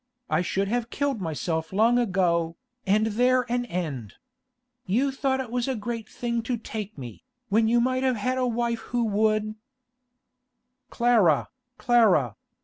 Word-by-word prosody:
I 155 +2 +3
should 195 +2 -1
have 235 +2 -1
killed 280 -6 -1
myself 160 0 -3
long 225 +5 +3
ago, 175 -6 +1 0.3
and 210 +3 +3
there 250 +4 +2
an 245 0 0
end. 150 - -4 0.7
You 250 +9 +1
thought 265 0 0
it 255 -3 -5
was 245 0 -1
a 265 - -1
great 225 0 -5
thing 235 -1 -2
to 240 +2 -2
take 215 -3 -6
me, 125 - -9 0.3
when 220 +2 +3
you 235 +1 +3
might 255 +2 +1
have 260 -1 +2
had 255 +4 -1
a 255 - +1
wife 235 -1 -1
who 240 +1 -2
would—' 215 0 +1 1.4
'Clara! 225 - +3 0.3
Clara! 205 - +3
225 Hz, 150 wpm, -26 LUFS, 190-245 Hz, 1.4 s, I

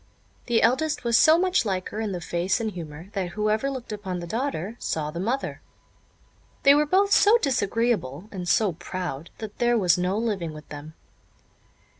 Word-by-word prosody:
The 235 -2 +2
eldest 290 +6 +1
was 235 -1 +1
so 310 +8 +7
much 370 -2 +2
like 190 -4 -2
her 215 - -6
in 215 -2 -2
the 180 - -3
face 175 +5 -1
and 220 -2 -2
humour, 165 -1 -9
that 180 -3 -3
whoever 215 +5 +1
looked 260 -4 -6
upon 200 -4 -4
the 170 - -6
daughter 225 - -3
saw 150 -1 -2
the 170 - -6
mother. 240 +9 -2 1.0
They 280 - +8
were 295 +1 +3
both 395 +5 +3
so 425 +3 +6
disagreeable, 230 - -1
and 180 -3 -5
so 205 -2 +3
proud, 170 -2 -5
that 215 -2 -8
there 240 0 +3
was 180 -4 +3
no 180 +3 0
living 200 -8 -2
with 150 - -11
them. 150 +2 -9
210 Hz, 180 wpm, -25 LUFS, 175-240 Hz, 1.0 s, They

